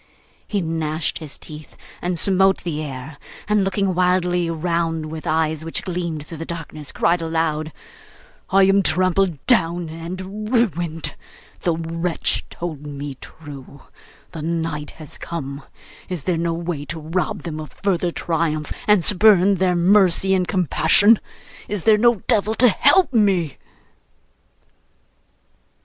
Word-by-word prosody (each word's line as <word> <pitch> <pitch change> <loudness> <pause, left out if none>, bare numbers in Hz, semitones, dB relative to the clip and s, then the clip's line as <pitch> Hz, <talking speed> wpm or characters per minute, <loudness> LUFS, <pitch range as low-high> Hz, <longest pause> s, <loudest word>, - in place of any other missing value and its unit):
He 205 -2 -1
gnashed 160 -1 -2
his 155 -3 -7
teeth 150 0 -11 0.2
and 175 0 -2
smote 190 +2 +3
the 155 -3 -3
air, 140 0 -7 0.3
and 210 -1 +2
looking 195 0 0
wildly 180 -1 +1
round, 165 -1 -1
with 160 +1 -7
eyes 160 -1 0
which 165 - -3
gleamed 170 -4 -4
through 160 0 -9
the - - -4
darkness, 155 -3 -7
cried 170 +1 +1
aloud: 160 -1 -1 0.8
'I 195 0 +5
am 195 +1 +4
trampled 185 -4 +1
down 175 -8 +2
and 185 +6 -6
ruined. 175 - 0 0.5
The 170 -2 0
wretch 165 +1 -1
told 155 -4 -6
me 145 0 -6
true. 140 -3 -11 0.5
The 165 -4 -7
night 160 -2 -3
has 155 -3 -11
come! 140 -4 -5 0.5
Is 180 -6 -4
there 180 - 0
no 165 0 -1
way 170 -3 -4
to 165 +2 -6
rob 165 +4 -2
them 155 -2 -5
of 155 -4 -8
further 180 -1 -1
triumph, 160 -3 -2
and 210 -5 +4
spurn 200 -1 +6
their 185 -1 +1
mercy 190 +1 +4
and 185 -2 +1
compassion? 190 +4 +4 0.5
Is 205 -5 -4
there 215 -1 +5
no 235 -3 +3
devil 215 +1 +2
to 250 +1 +6
help 285 - +3
me? 190 - +2
170 Hz, 135 wpm, -21 LUFS, 155-190 Hz, 0.8 s, spurn